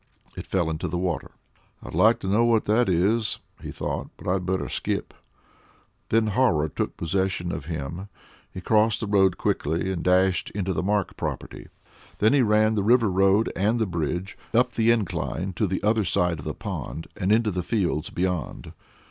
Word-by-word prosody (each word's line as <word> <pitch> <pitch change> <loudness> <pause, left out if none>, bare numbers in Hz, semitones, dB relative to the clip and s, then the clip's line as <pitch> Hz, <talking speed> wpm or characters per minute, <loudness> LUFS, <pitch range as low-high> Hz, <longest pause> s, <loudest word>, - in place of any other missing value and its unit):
It - - -7
fell 85 -4 0
into 80 - -3
the 85 - -2
water. 90 -2 -2 0.5
"I'd - - -9
like 110 +2 +5
to - - -4
know 105 +5 +3
what 115 -2 +3
that 110 +1 +2
is," 105 +5 +1 0.2
he - - -7
thought; - - -4
"but - - -11
I'd 90 0 0
better 95 0 -1
skip." - - -3 1.0
Then 115 0 +3
horror 105 -9 +2
took - - -3
possession 90 0 -1
of - - -5
him; 85 +4 -5 0.4
he 95 - -7
crossed 110 +3 +2
the - - -3
road 95 -3 +3
quickly 80 +5 -1
and 90 -3 -3
dashed 90 0 +2
into 95 -2 -1
the 80 - -1
Mark 100 +1 0
property. - - -5 0.5
Then 110 +5 +3
he 140 - +4
ran 110 -1 +3
to - - +2
River 115 0 +3
Road 95 +3 +3
and 105 +5 +1
the 110 - +1
bridge, 90 +1 -3 0.2
up 125 +1 +4
the 115 -1 +1
incline 95 -3 -1
on 105 - +3
the 95 +1 -3
other 110 +1 +2
side 90 -2 0
of - - -9
the - - -4
pond, 80 - -5
and 95 0 -1
into 110 0 +3
the 90 -1 -2
fields 90 -5 -1
beyond. 90 -5 -3
95 Hz, 185 wpm, -25 LUFS, 90-110 Hz, 1.0 s, like